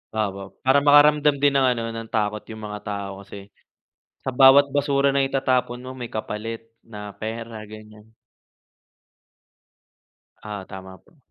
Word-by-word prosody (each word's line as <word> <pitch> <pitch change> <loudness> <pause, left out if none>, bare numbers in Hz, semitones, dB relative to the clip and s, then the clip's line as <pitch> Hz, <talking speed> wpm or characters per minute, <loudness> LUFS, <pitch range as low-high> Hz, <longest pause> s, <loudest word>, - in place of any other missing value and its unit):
Opo, 100 -2 -3
para 130 +2 +5
makaramdam 145 0 +5
din 145 +1 +3
ng 130 - +3
ano, 115 - -3
ng 115 0 -7
takot 105 -1 -1
'yong 110 -1 -9
mga 105 0 -6
tao 100 -1 -5
kasi, 100 0 -12 0.7
sa 130 - -2
bawat 135 +2 +6
basura 140 -1 +2
na 140 - +2
itatapon 130 -2 0
mo 130 - -7
may 125 -2 -7
kapalit, 110 +1 -5 0.2
na 105 -2 -9
pera, 115 +1 -6
ganyan. 110 0 -14 2.3
Ah, 105 -2 -6
tama 95 -1 -10
po. 165 - -27
115 Hz, 140 wpm, -23 LUFS, 105-135 Hz, 2.3 s, bawat